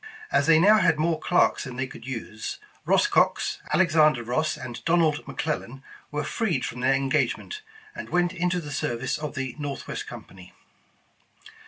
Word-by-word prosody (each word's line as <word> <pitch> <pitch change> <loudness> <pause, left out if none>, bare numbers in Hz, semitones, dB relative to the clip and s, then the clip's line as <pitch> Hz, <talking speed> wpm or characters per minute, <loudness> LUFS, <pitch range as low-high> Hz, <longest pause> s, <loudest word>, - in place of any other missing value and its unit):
As - - +2
they 165 -1 +7
now 210 +6 +6
had 165 -5 +3
more 160 +1 +1
clerks 180 - +2
than 130 -2 -7
they 135 +2 -1
could 130 - -11
use, 110 -4 -5 0.3
Eoss - - +4
Cox, - - +2
Alexander 155 -8 +4
Ross, 125 +7 -1
and 125 -2 -8
Donald 165 -3 +2
McLellan 135 -4 -4 0.3
were 150 0 -2
freed 170 - -1
from 125 - -6
their 135 +1 +3
engagement, 135 - -1 0.3
and - - -8
went 175 0 +1
into 180 0 0
the 150 -3 -7
service 120 -1 -2
of 150 -1 -5
the 130 -2 -4
Northwest 145 -2 -5
Company. 90 -1 -11
150 Hz, 160 wpm, -26 LUFS, 130-170 Hz, 0.3 s, they